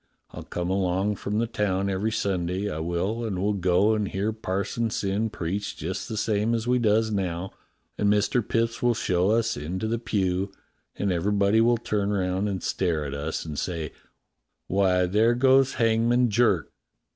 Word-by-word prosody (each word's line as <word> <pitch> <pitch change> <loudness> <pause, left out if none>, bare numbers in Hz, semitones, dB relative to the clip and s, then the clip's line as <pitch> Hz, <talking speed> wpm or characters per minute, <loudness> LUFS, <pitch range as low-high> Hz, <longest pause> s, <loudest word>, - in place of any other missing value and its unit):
I'll - - -8
come 90 +1 -4
along 95 +2 0
from 105 +1 -3
the 115 - +2
town 100 -4 -1
every 100 +3 -1
Sunday, 95 -1 -1
I 75 - -4
will, 90 +8 -2
and 105 -5 -2
we'll 105 +3 +1
go 95 +2 +3
and 105 -2 0
hear 100 +4 -2
Parson 110 +2 -2
Syn 105 +2 -1
preach 100 +1 -4
just 90 +5 -4
the 110 - -4
same 105 +1 +1
as 115 -1 -2
we 125 0 +3
does 110 -1 +2
now, 95 -2 -2 0.5
and 100 - +3
Mister 105 +4 +2
Mipps 115 +1 -1
will 120 -1 +3
show 90 -3 +1
us 115 +1 +2
into 90 +8 -3
the 115 +1 -1
pew, 95 -4 -1 0.4
and 100 -1 -1
everybody 100 +4 +2
will 120 +1 +4
turn 105 -3 -1
round 95 0 0
and 95 -2 -4
stare 85 -5 0
at 70 - -5
us 75 +4 -3
and 75 -3 -4
say: 80 -4 -3 0.7
*Why, 95 -1 +2
there 110 +6 +3
goes 135 +1 +4
Hangman 115 +1 +2
Jerk!' 105 -7 +2
100 Hz, 175 wpm, -26 LUFS, 90-110 Hz, 0.7 s, will